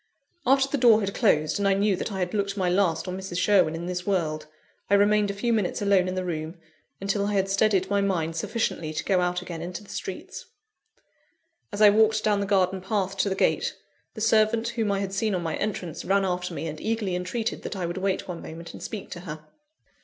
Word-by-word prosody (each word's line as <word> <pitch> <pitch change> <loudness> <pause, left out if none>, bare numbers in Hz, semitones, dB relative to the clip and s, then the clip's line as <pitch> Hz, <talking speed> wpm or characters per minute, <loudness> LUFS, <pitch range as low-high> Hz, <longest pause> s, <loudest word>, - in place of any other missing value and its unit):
After 270 +1 +4
the 280 0 -2
door 230 -3 +6
had 200 -1 -2
closed, 155 -7 +2
and 200 - +2
I 195 - +4
knew 200 0 +2
that 185 - -4
I 195 - -4
had 180 -1 -2
looked 200 -1 -1
my 185 -2 +1
last 180 -2 +1
on 180 - -3
Mrs. 190 -2 -5
Sherwin 185 -5 +3
in 170 +1 -5
this 180 0 -3
world, 160 -6 -1 0.4
I 200 - +5
remained 205 0 +3
a - - -1
few 235 +4 0
minutes 205 -5 0
alone 200 -3 +3
in 185 - -2
the 185 0 -2
room, 160 0 -4 0.4
until 200 +1 0
I 210 - -1
had 195 -1 +1
steadied 195 -2 +2
my 200 0 +1
mind 165 -5 0
sufficiently 165 -3 -2
to - - -3
go 190 -3 +2
out 180 0 -1
again 170 -3 -6
into 180 +4 -6
the 200 - -13
streets. 190 - -6 1.2
As 205 0 +1
I 205 - +9
walked 215 0 +3
down 210 -1 +2
the 200 - -2
garden 190 -1 +2
path 195 0 -1
to 200 - +1
the 190 - -1
gate, - - +1 0.4
the 220 - -6
servant 225 +1 +3
whom 225 -3 -1
I 200 0 0
had 195 -1 -3
seen 205 0 0
on 175 - -2
my 165 -1 -2
entrance, 180 -6 -3
ran 195 +1 +2
after 180 -1 -2
me, - - -4
and 155 -1 -6
eagerly 220 -4 -1
entreated 220 +6 -3
that - - -5
I 185 -2 -2
would 175 +2 -4
wait 190 0 -1
one 175 -2 -6
moment 170 +1 -9
and - - -10
speak 215 -4 -6
to 175 - -6
her. 155 -3 -8
195 Hz, 235 wpm, -26 LUFS, 180-210 Hz, 1.2 s, I